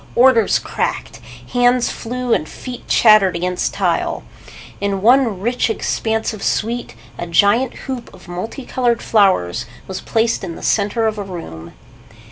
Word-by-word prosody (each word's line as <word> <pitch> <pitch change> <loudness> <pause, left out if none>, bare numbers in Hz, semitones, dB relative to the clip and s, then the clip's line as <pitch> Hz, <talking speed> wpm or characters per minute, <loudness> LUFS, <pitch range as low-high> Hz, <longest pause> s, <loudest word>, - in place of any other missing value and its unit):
Orders 240 -3 +5
cracked. - - -4 0.3
Hands 245 0 +3
flew 250 0 -2
and 155 - 0
feet 250 -2 -9
chattered 215 -5 +5
against 180 +1 -2
tile. - - 0 0.6
In 200 -1 -2
one 240 -4 +4
rich 240 +4 0
expansive 220 -1 -2
suite 235 +3 -2 0.2
a 175 - -4
giant 205 +9 +3
hoop 260 -3 -5
of 190 -1 -16
multi 220 +9 -6
colored 240 -2 0
flowers 190 - +2 0.2
was 190 - -5
placed 225 -1 0
in 170 -3 -5
the - - -10
center 215 +2 +1
of 215 -1 -1
a - - -3
room. 85 - -8
220 Hz, 140 wpm, -18 LUFS, 190-240 Hz, 0.6 s, Orders